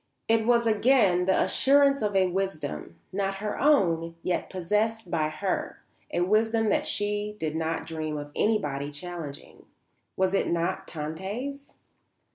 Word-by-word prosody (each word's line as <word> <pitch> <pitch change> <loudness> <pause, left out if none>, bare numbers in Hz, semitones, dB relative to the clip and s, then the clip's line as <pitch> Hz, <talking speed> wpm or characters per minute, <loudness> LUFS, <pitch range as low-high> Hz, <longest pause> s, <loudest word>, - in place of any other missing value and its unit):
It 225 0 +2
was 235 -1 +4
again 215 -5 +3
the 190 - +3
assurance 275 0 +4
of 205 -2 -1
a 190 -1 +5
wisdom, 180 - -3 0.2
not 195 0 -1
her 210 +1 -4
own, 170 - +3
yet 180 - -1
possessed 210 +2 -1
by 155 -2 +1
her, 185 +5 -3 0.3
a 175 - 0
wisdom 220 +3 +2
that - - +1
she 205 0 -1
did 155 -2 -2
not 160 0 -2
dream 155 -2 -4
of 145 0 -7
anybody 145 -10 0
challenging. 150 -1 -8 0.5
Was 190 0 +2
it 195 - +1
not 170 0 -1
Tante's? 200 - -5
190 Hz, 140 wpm, -27 LUFS, 165-220 Hz, 0.5 s, a